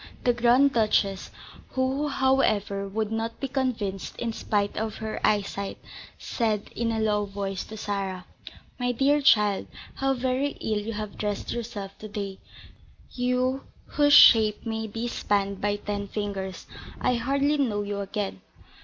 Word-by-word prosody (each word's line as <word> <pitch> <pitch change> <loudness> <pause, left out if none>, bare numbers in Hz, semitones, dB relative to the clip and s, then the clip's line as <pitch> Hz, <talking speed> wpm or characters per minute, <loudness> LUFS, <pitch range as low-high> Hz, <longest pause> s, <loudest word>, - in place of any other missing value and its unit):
The 245 - +4
Grand 245 +4 +4
Duchess, 210 -4 +1 0.4
who, 265 +3 0
however, 215 -8 +1
would 215 +2 -2
not 225 +1 -3
be 275 - -2
convinced 240 -8 -2
in 230 -1 -2
spite 205 -2 -1
of 220 0 -2
her 220 0 -4
eyesight, 200 -1 0 0.4
said, 215 -4 -2
in 230 0 0
a 225 - -1
low 210 -1 +1
voice, 195 -1 -4
to 220 - -9
Sarah: 195 -3 -3 0.5
"My 245 0 0
dear 280 +4 +3
child, 210 -8 +4 0.3
how 270 0 +1
very 260 +3 0
ill 215 -1 -1
you 220 +2 -4
have 215 -1 -6
dressed 205 -1 -2
yourself 215 -5 -5
to 215 - -7
day, 200 -2 -5 0.7
you, 250 +2 0 0.2
whose 290 0 +3
shape 220 -5 +7
may 220 -1 -2
be 225 +3 -4
spanned 200 -4 -1
by 205 0 +1
ten 205 0 -4
fingers. 195 -2 -4 0.3
I 255 - +2
hardly 275 +5 +1
know 210 -7 +1
you 200 0 -3
again." 200 - -3
220 Hz, 150 wpm, -26 LUFS, 205-250 Hz, 0.7 s, shape